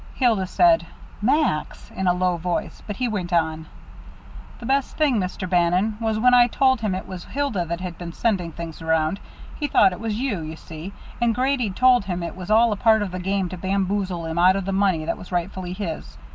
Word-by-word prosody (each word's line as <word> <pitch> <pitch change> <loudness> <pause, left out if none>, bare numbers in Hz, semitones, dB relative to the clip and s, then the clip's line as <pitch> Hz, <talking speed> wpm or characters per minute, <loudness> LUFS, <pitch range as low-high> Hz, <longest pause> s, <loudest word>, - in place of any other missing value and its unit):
Hilda 225 -8 +2
said, 335 - +4 0.3
"Max," 260 - 0
in 190 - -2
a 180 - +5
low 180 0 +1
voice, 175 +1 -3
but 205 - -4
he 250 +3 -1
went 190 -6 -3
on: 160 -2 0 0.9
"The 235 - -10
best 270 +2 0
thing, 290 -6 +3
Mr. 185 0 -3
Bannon, 180 +4 +2
was 220 -1 0
when 250 +3 +4
I 245 -1 +7
told 260 0 +2
him 210 -4 0
it 185 - -6
was 185 -2 -7
Hilda 270 -11 -2
that 170 +1 -4
had 180 -2 -6
been 175 -1 -6
sending 185 -4 -1
things 165 -1 -8
around. 160 +3 +1 0.4
He 295 - 0
thought 190 -8 +4
it - - -8
was 220 -1 -2
you, 245 -8 -1
you 155 0 -6
see, 160 +3 -9 0.3
and 235 -2 +2
Grady'd 250 -6 0
told 250 -3 +4
him 180 -2 -3
it 170 - -5
was 185 0 -8
all 225 +2 +5
a - - 0
part 220 0 +4
of 195 - -4
the 185 - -4
game 190 +1 -1
to 185 - -6
bamboozle 190 -2 -1
him 160 +1 -2
out 185 +2 +6
of 195 -1 -2
the 195 - -2
money 190 -5 +1
that - - -2
was 180 - -11
rightfully 180 +1 -3
his. 160 - -6
190 Hz, 220 wpm, -23 LUFS, 175-225 Hz, 0.9 s, I